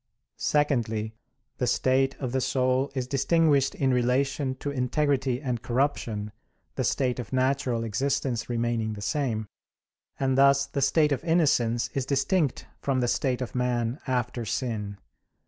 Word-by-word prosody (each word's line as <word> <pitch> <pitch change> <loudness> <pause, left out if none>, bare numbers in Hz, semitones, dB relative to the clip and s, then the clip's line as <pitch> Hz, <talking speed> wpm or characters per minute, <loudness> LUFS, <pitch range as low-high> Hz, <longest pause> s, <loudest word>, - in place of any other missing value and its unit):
Secondly, 115 -7 0 0.5
the 125 - +1
state 135 +2 +2
of 130 -3 -3
the 130 0 0
soul 130 +1 +1
is 130 -2 -1
distinguished 140 +1 +2
in 135 -2 +1
relation 130 +2 +1
to 145 +2 -4
integrity 130 -1 0
and 125 -5 -3
corruption, 120 -4 -1 0.4
the - - -2
state 125 -2 0
of 120 - -6
natural 130 -2 +1
existence 120 +1 -1
remaining 115 -2 -1
the 105 - -8
same: 115 -6 -1 0.7
and 135 -1 +1
thus 140 0 +5
the 140 - -3
state 150 +3 +3
of 135 - -1
innocence 130 -9 +2
is 135 -2 -2
distinct 140 +2 +1 0.2
from 135 -2 0
the 125 - +1
state 125 +1 0
of 125 - -4
man 125 0 -1
after 125 -2 -1
sin. 105 -2 -3
130 Hz, 145 wpm, -27 LUFS, 120-140 Hz, 0.7 s, thus